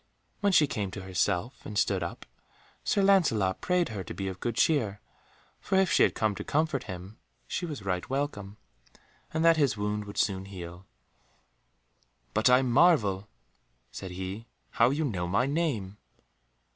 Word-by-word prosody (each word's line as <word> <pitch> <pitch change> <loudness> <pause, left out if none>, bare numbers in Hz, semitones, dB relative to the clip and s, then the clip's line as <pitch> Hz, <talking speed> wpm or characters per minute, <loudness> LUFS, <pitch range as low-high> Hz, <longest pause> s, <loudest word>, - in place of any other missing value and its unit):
When 200 -1 +2
she 155 -5 +6
came 105 -8 -3
to 95 - -7
herself 95 +4 -1
and 105 - -6
stood 95 -1 +2
up, 85 - -5 0.6
Sir 200 - +2
Lancelot 125 - +3
prayed 180 -3 +1
her 100 -4 -5
to - - -7
be 95 - -3
of 95 - -7
good 120 -1 -2
cheer, 110 -5 +2 0.6
for 190 - -2
if 190 -2 +3
she - - +4
had - - +4
come 110 -2 +1
to - - -4
comfort 155 -3 0
him 95 +4 -8 0.3
she 175 - -3
was 140 -11 -7
right 90 -2 -2
welcome, 120 -8 -3 0.7
and 160 +1 0
that 165 -1 +6
his 140 -7 +2
wound 105 0 -2
would 100 0 -9
soon 95 -2 0
heal. 90 -1 -9 1.5
"But 110 +3 +3
I 125 +1 +5
marvel," 120 - +3 0.6
said 95 - -7
he, 95 +5 -6 0.2
"how 115 +1 +4
you 150 +3 0
know 90 -9 -2
my 100 +7 +2
name." 135 - -1
110 Hz, 165 wpm, -29 LUFS, 95-145 Hz, 1.5 s, she